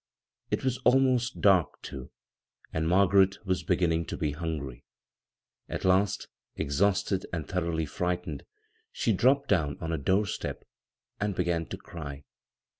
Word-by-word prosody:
It - - -1
was 130 -1 0
almost 125 -1 +3
dark, 95 -6 +4
too, 65 -2 -7 0.6
and 80 0 0
Margaret 95 +2 +4
was 95 -1 0
beginning 85 -2 +1
to - - -4
be 75 -2 0
hungry. 70 -5 -5 0.9
At - - -4
last, 95 +2 +2 0.3
exhausted 95 +5 +1
and 80 -3 -3
thoroughly 85 -3 -1
frightened, 90 +4 -3 0.5
she 115 - +1
dropped 130 +8 +3
down 75 -8 +1
on 80 - -3
a 80 - -1
door 95 +9 +2
step 100 - -4 0.6
and 100 -1 -1
began 85 -2 0
to - - -6
cry. 70 -4 -8
90 Hz, 135 wpm, -29 LUFS, 80-100 Hz, 0.9 s, dark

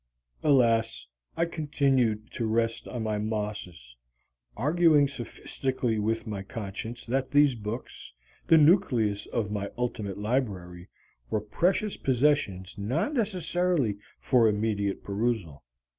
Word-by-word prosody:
Alas, 115 -6 +3 0.3
I 170 - +2
continued 135 -9 0
to 115 - -2
rest 115 +1 0
on 120 -3 -4
my 105 -1 -1
Mosses, 105 - -4 0.6
arguing 155 +2 +4
sophistically 125 -2 -3
with 110 +1 -1
my 105 -3 -4
conscience 110 +3 -6
that 130 +2 -1
these 145 -1 +5
books, 110 +1 -7 0.4
the 165 - +7
nucleus 135 - +3
of 105 -3 -2
my 100 -1 -3
ultimate 110 -5 -3
library, 100 -6 -2 0.4
were 110 - +1
precious 180 - 0
possessions 125 -9 +1
not 130 - -1
necessarily 180 - 0 0.2
for 120 -3 +4
immediate 105 -2 -1
perusal. 100 - -2
115 Hz, 115 wpm, -28 LUFS, 105-140 Hz, 0.6 s, the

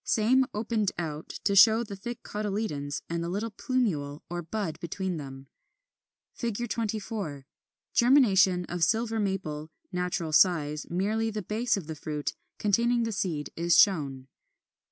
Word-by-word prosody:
Same 250 +4 +3
opened 215 -1 0
out, 155 -2 -4
to 200 - +2
show 220 +4 +7
the 205 -3 -7
thick 235 +4 -7
cotyledons 200 -9 -3
and 170 0 -2
the 170 - -3
little 210 +5 -2
plumule 180 - -1
or 175 0 -2
bud 170 0 -4
between 180 +1 -3
them. 135 -2 -8 0.9
24. 215 - -3 0.5
Germination 195 -8 +5
of 175 -1 -2
Silver 225 +4 +1
Maple, 170 -7 -2 0.2
natural 180 -3 -2
size; 150 -4 +3
merely 215 +6 0
the 210 -2 -4
base 220 +5 0
of 190 - -5
the 160 - -5
fruit, 150 -1 -4 0.2
containing 235 +3 +2
the 225 - -1
seed, 170 -7 -2
is 170 0 +3
shown. 140 -9 +3
195 Hz, 135 wpm, -28 LUFS, 160-220 Hz, 0.9 s, show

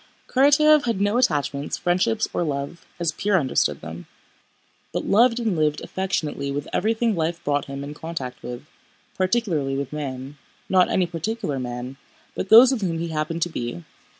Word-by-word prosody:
Karatáev 290 +2 +5
had 230 -5 0
no 205 +4 +2
attachments, 145 - 0
friendships, 175 -11 +1
or - - 0
love, 145 +1 -4
as 170 -2 0
Pierre 200 +1 +1
understood 120 - 0
them, 80 +3 -8 0.8
but - - -3
loved 235 +3 +4
and 220 -5 0
lived 150 -1 +1
affectionately 160 -7 -2
with 140 +1 -3
everything 225 +2 +1
life 170 +1 -2
brought 145 0 0
him 140 0 -6
in 145 +1 -6
contact 150 -5 -6
with, 125 +3 -7 0.5
particularly 185 -9 0
with 140 0 -4
man—not 145 +6 -2
any 185 - +2
particular 170 - -3
man, 125 +1 -5 0.4
but 190 - -4
those 240 +4 +9
with 255 -5 -1
whom 170 -4 -1
he 170 +1 -3
happened 160 +1 -1
to 175 - -2
be. 120 - -5
165 Hz, 160 wpm, -23 LUFS, 140-200 Hz, 0.8 s, those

